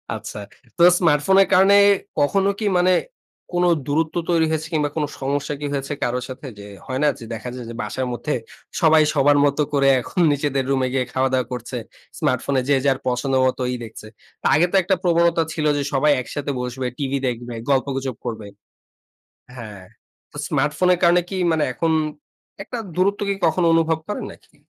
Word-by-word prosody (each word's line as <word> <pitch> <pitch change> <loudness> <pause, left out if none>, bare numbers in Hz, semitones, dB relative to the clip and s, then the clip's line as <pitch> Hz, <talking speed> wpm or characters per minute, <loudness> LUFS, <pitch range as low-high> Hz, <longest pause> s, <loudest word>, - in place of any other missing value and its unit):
আচ্ছা। - - -7 0.4
তো - - -1 0.2
স্মার্টফোনের 175 +4 +4
কারণে 195 +2 +6 0.4
কখনো 195 +7 +2
কি 220 - -2
মানে 180 +1 +3 0.6
কোন 175 0 +1 0.2
দূরত্ব 155 +2 -1
তৈরি 165 -2 +3
হয়েছে 160 0 -2
কিংবা 150 -2 +1
কোন 155 -2 0
সমস্যা 140 +2 -2
কি 150 - -4
হয়েছে 140 +1 -3
কারো 125 +1 0
সাথে? 130 +3 -9
যে, - - -9 0.2
হয় 130 -1 -3
না? - - +4
যে, - - -10
দেখা 115 +2 -6
যায় 125 -2 -7
যে, - - -6
বাসার 110 +5 -3
মধ্যে 150 +5 -3 0.5
সবাই 160 -1 +6
সবার 145 0 +4
মত 140 -1 +1 0.2
করে 140 -1 +3
এখন 180 - -5
নিজেদের 140 -2 -1
রুমে 130 -1 +1
গিয়ে 130 -2 0
খাওয়া 130 0 +1
দাওয়া 130 -1 +1
করছে। 125 +1 -5 0.4
স্মার্টফোনে 130 +1 0
যে, 145 - +5
যার 135 -1 +3
পছন্দ 125 +2 -1
মতো 130 0 0
ই - - -2
দেখছে। 110 -1 -10 0.5
আগে 160 - +4
তো - - -1
একটা 190 +2 +2
প্রবণতা 170 -1 +3
ছিল 155 - -2
যে, - - 0
সবাই 145 +2 +3
একসাথে 145 +3 -4
বসবে, 125 +1 -4
টিভি 140 -1 -1
দেখবে, 120 0 -4 0.2
গল্পগুজব 135 -2 0
করবে। 110 -3 -5 1.1
হ্যাঁ। 105 -6 -9 0.5
তো - - -14
স্মার্টফোনের 175 +5 +1
কারণে 175 +1 +5
কি 195 - -5 0.2
মানে 155 -2 +1
এখন 165 +6 -1 0.7
একটা 240 +5 -6 0.2
দূরত্ব 195 +3 +1
কি 200 - +1
কখনো 170 +1 +2
অনুভব 165 -1 +2
করেন 210 - -4
নাকি? - - -21
145 Hz, 175 wpm, -21 LUFS, 130-165 Hz, 1.1 s, কারণে